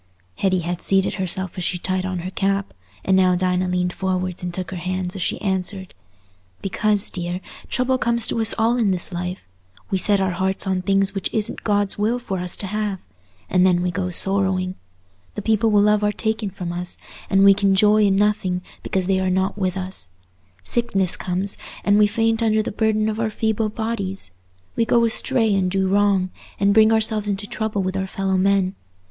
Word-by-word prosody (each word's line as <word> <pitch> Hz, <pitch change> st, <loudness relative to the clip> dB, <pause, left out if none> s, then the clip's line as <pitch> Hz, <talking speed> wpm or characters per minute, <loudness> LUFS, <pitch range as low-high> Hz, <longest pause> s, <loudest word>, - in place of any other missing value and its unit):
Hetty 185 Hz, -2 st, +1 dB
had 175 Hz, +1 st, -4 dB
seated 195 Hz, 0 st, +1 dB
herself 190 Hz, -1 st, -1 dB
as -, -, -3 dB
she 180 Hz, -, -1 dB
tied 185 Hz, +1 st, -1 dB
on 185 Hz, -2 st, -3 dB
her 185 Hz, -, -4 dB
cap, 195 Hz, 0 st, -1 dB, 0.3 s
and 190 Hz, -, +3 dB
now 185 Hz, -1 st, +4 dB
Dinah 180 Hz, 0 st, 0 dB
leaned 180 Hz, 0 st, 0 dB
forwards 185 Hz, -1 st, -2 dB
and 180 Hz, 0 st, -4 dB
took 185 Hz, 0 st, -5 dB
her 185 Hz, -, -5 dB
hands 185 Hz, +1 st, -3 dB
as 190 Hz, -, -5 dB
she -, -, -1 dB
answered, 190 Hz, -1 st, -2 dB, 0.7 s
"Because, 205 Hz, +1 st, 0 dB
dear, 175 Hz, 0 st, -4 dB, 0.3 s
trouble 255 Hz, 0 st, 0 dB
comes 235 Hz, -2 st, 0 dB
to 230 Hz, -, 0 dB
us 225 Hz, -, +3 dB
all 230 Hz, +2 st, +2 dB
in 225 Hz, -4 st, +2 dB
this 185 Hz, 0 st, +2 dB
life: 180 Hz, +1 st, -4 dB, 0.5 s
we 190 Hz, -, +1 dB
set 200 Hz, +1 st, +2 dB
our 190 Hz, -1 st, +1 dB
hearts 190 Hz, +2 st, 0 dB
on 190 Hz, -1 st, 0 dB
things 195 Hz, +1 st, +1 dB
which 195 Hz, -2 st, -2 dB
it -, -, -2 dB
isn't 210 Hz, -, -2 dB
God's 205 Hz, -1 st, 0 dB
will 220 Hz, +4 st, +1 dB
for 200 Hz, -7 st, -4 dB
us 180 Hz, 0 st, +1 dB
to -, -, 0 dB
have, 205 Hz, -1 st, -2 dB, 0.5 s
and 180 Hz, -, +3 dB
then 180 Hz, -1 st, +3 dB
we 180 Hz, -, 0 dB
go 180 Hz, +1 st, -2 dB
sorrowing; 190 Hz, 0 st, 0 dB, 0.6 s
the -, -, -4 dB
people 220 Hz, 0 st, +2 dB
we 210 Hz, -1 st, +4 dB
love 210 Hz, 0 st, +3 dB
are 210 Hz, -, +2 dB
taken 220 Hz, -1 st, -2 dB
from 180 Hz, -2 st, -6 dB
us, 175 Hz, 0 st, -5 dB, 0.3 s
and 195 Hz, 0 st, +4 dB
we 200 Hz, -, +8 dB
can 195 Hz, -1 st, +2 dB
joy 210 Hz, +2 st, +4 dB
in 195 Hz, -1 st, +3 dB
nothing 195 Hz, -3 st, +1 dB, 0.2 s
because 190 Hz, -1 st, -1 dB
they 190 Hz, 0 st, +1 dB
are 185 Hz, 0 st, 0 dB
not 190 Hz, +2 st, 0 dB
with 190 Hz, -2 st, -2 dB
us; 185 Hz, -, -2 dB, 0.5 s
sickness 195 Hz, -, +1 dB
comes, 190 Hz, +2 st, -3 dB, 0.2 s
and 205 Hz, +1 st, +4 dB
we 210 Hz, -, +6 dB
faint 225 Hz, +1 st, +1 dB
under 220 Hz, -1 st, +2 dB
the -, -, -4 dB
burden 215 Hz, 0 st, +1 dB
of 220 Hz, 0 st, -2 dB
our 225 Hz, -1 st, 0 dB
feeble 220 Hz, 0 st, -1 dB
bodies; 205 Hz, -, -1 dB, 0.4 s
we 230 Hz, -, +2 dB
go 230 Hz, +1 st, +3 dB
astray 225 Hz, -1 st, +1 dB
and 190 Hz, -2 st, +1 dB
do 190 Hz, 0 st, 0 dB
wrong, 195 Hz, -1 st, +2 dB, 0.3 s
and 200 Hz, 0 st, +3 dB
bring 220 Hz, +1 st, +6 dB
ourselves 220 Hz, -1 st, +3 dB
into 200 Hz, 0 st, -2 dB
trouble 215 Hz, -1 st, -2 dB
with 185 Hz, 0 st, -2 dB
our 190 Hz, 0 st, -2 dB
fellow 190 Hz, 0 st, -1 dB
men. 190 Hz, 0 st, +2 dB
195 Hz, 205 wpm, -21 LUFS, 185-210 Hz, 0.7 s, we